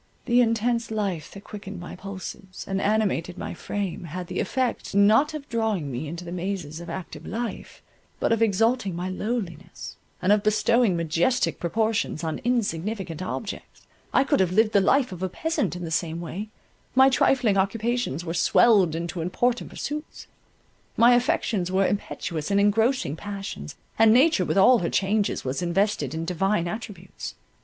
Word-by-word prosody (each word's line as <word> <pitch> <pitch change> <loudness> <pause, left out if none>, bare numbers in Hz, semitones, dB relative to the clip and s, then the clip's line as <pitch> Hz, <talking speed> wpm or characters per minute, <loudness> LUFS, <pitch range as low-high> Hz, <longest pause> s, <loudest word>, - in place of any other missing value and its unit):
The 245 +1 +4
intense 230 0 +1
life 200 -7 -2
that 200 - -11
quickened 200 -2 -8
my 175 - -8
pulses, 190 0 -8
and 195 0 -1
animated 195 -5 0
my - - -5
frame, 195 -4 -4
had 180 +3 -5
the - - -4
effect, 255 -5 -1
not 225 +10 +4
of 290 -2 -7
drawing 220 -10 -1
me 130 +5 -4
into 170 +3 -6
the 170 - -7
mazes 175 -4 -4
of 170 0 -8
active 165 -3 -7
life, 230 +6 -5 0.4
but - - +1
of 230 0 +2
exalting 225 -1 +2
my 180 +2 -3
lowliness, 185 -4 -5 0.2
and 185 - +2
of 210 - +3
bestowing 215 -1 +3
majestic 170 +9 +1
proportions 215 -1 -1
on 160 -1 -2
insignificant 200 - -2
objects—I 200 +7 -3
could 275 - +1
have 185 -2 +2
lived 215 +3 +3
the 200 - +5
life 255 +5 +3
of 180 -1 -8
a 185 - -1
peasant 320 - -1
in 180 - -6
the 160 - -6
same 165 0 -1
way—my 215 +8 -1
trifling 245 -5 +3
occupations 210 - -1
were 165 - -3
swelled 185 -1 +4
into 170 +1 -4
important 240 +8 0
pursuits; 300 +2 -6 0.7
my 240 +1 +7
affections 240 - +1
were 190 +1 +3
impetuous 170 -5 -3
and 200 0 +3
engrossing 220 - +2
passions, 195 - -6 0.2
and 225 -1 +7
nature 290 +8 +4
with - - -1
all 235 +5 +6
her 170 - -1
changes 200 -2 0
was 130 +6 -2
invested 175 - 0
in 165 +1 -3
divine 185 +1 0
attributes. 195 -2 -7
200 Hz, 160 wpm, -25 LUFS, 175-230 Hz, 0.7 s, my